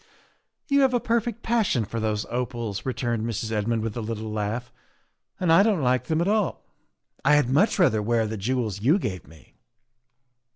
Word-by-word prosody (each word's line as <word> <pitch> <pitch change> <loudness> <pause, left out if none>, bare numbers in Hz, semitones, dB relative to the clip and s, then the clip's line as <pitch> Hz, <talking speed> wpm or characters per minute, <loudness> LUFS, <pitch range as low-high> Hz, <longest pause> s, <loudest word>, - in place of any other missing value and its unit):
" - - -49
You 280 0 +5
have 260 -2 +3
a - - +3
perfect 230 0 -1
passion 220 - +1
for 115 +3 -5
those 110 -1 -1
opals," 120 -3 -3
re 130 - 0
turned 120 -3 -1
Mrs. 115 -1 -3
Redmond 110 +1 0
with 110 -2 -3
a 120 - -3
little 110 0 -4
laugh, 110 +3 -3 0.3
" - - -48
and 175 -3 +3
I 175 - +7
don't 200 -7 +2
like 125 0 +1
them 160 +3 0
at 175 - 0
all. 210 -3 0 0.6
I 150 +2 +5
had 145 -4 +2
much 170 +11 +3
rather 135 - +3
wear 115 +1 +1
the 110 +1 -4
jewels 110 -1 -2
you 145 - +4
gave 95 - -4
me." 80 -3 -18
120 Hz, 200 wpm, -25 LUFS, 110-170 Hz, 0.6 s, I